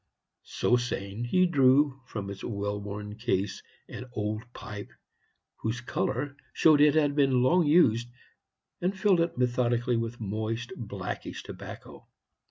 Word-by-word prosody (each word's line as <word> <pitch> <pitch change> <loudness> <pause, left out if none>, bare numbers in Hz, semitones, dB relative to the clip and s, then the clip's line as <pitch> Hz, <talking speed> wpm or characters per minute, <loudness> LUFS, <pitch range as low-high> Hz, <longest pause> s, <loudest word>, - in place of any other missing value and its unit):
So 125 - +2
saying, 115 -2 -3
he 185 +9 +3
drew 135 -3 +4
from 100 -4 -5
its 100 - -9
well 100 -1 -3
worn 105 +1 -6
case 105 -4 -1 0.3
an 125 - -7
old 105 0 -2
pipe, 105 -3 -8 0.7
whose 110 +2 -2
color 135 +3 -2 0.2
showed 155 -2 +5
it 150 0 +6
had 145 -2 +3
been 135 -4 +3
long 170 +5 +4
used, 120 -8 +4 0.7
and 185 +2 0
filled 190 -3 +3
it 170 - -1
methodically 120 -1 +1
with 115 +1 -3
moist, 110 +3 -3
blackish 100 -5 -6
tobacco. - - -10
120 Hz, 135 wpm, -28 LUFS, 105-140 Hz, 0.7 s, it